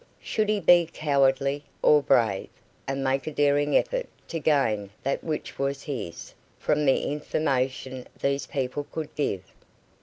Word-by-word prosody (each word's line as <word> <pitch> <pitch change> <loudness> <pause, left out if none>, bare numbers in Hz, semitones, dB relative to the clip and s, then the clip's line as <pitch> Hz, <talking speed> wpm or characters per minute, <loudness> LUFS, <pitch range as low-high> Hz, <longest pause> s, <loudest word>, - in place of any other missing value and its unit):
Should 215 -1 -1
he 215 -1 +2
be 175 -2 +5
cowardly, 140 -1 +1 0.2
or 150 -1 +6
brave, 115 -8 +2 0.4
and 135 0 -2
make 135 +1 0
a - - -1
daring 145 0 +3
effort - - -1 0.2
to 165 - -2
gain 115 -10 +1
that 135 - -1
which 155 -2 -4
was 140 0 -1
his, 130 - -6 0.2
from 150 -1 +1
the 135 - +3
information 130 -3 -1
these 140 0 0
people 135 +1 -3
could 160 -2 -5
give? 100 -10 -1
140 Hz, 145 wpm, -26 LUFS, 135-150 Hz, 0.4 s, or